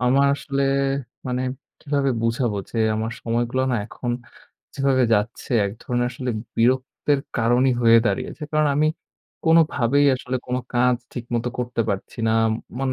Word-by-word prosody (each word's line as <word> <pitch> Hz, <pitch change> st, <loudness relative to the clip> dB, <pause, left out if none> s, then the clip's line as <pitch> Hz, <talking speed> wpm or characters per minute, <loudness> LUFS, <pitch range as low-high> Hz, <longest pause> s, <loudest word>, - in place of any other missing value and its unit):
আমার 135 Hz, +3 st, +4 dB
আসলে 140 Hz, -1 st, -2 dB, 0.6 s
মানে 125 Hz, 0 st, -1 dB, 0.4 s
কীভাবে 140 Hz, -2 st, 0 dB
বুঝাবো 115 Hz, -2 st, 0 dB
যে -, -, -7 dB, 0.2 s
আমার 110 Hz, +1 st, -2 dB
সময়গুলো 120 Hz, +2 st, 0 dB
না 120 Hz, -, +1 dB
এখন 120 Hz, +1 st, -5 dB, 0.6 s
যেভাবে 135 Hz, -2 st, +2 dB
যাচ্ছে 105 Hz, +1 st, -2 dB, 0.2 s
এক 100 Hz, -, -4 dB
ধরণের 120 Hz, 0 st, 0 dB
আসলে 125 Hz, 0 st, -4 dB, 0.3 s
বিরক্তের 130 Hz, +4 st, +1 dB, 0.2 s
কারণই 120 Hz, +3 st, +3 dB
হয়ে 115 Hz, 0 st, +7 dB
দাঁড়িয়েছে। 100 Hz, +9 st, -2 dB
কারণ 155 Hz, 0 st, +3 dB
আমি 155 Hz, +1 st, +3 dB, 0.6 s
কোনভাবেই 145 Hz, -4 st, +4 dB
আসলে 130 Hz, 0 st, -3 dB
কোনো 125 Hz, +1 st, -1 dB
কাজ 125 Hz, 0 st, +3 dB, 0.2 s
ঠিকমতো 120 Hz, 0 st, -3 dB
করতে 125 Hz, -1 st, -2 dB
পারছি 100 Hz, +3 st, -4 dB
না, -, -, +3 dB, 0.5 s
মানে 135 Hz, -1 st, 0 dB
125 Hz, 140 wpm, -23 LUFS, 115-135 Hz, 0.6 s, হয়ে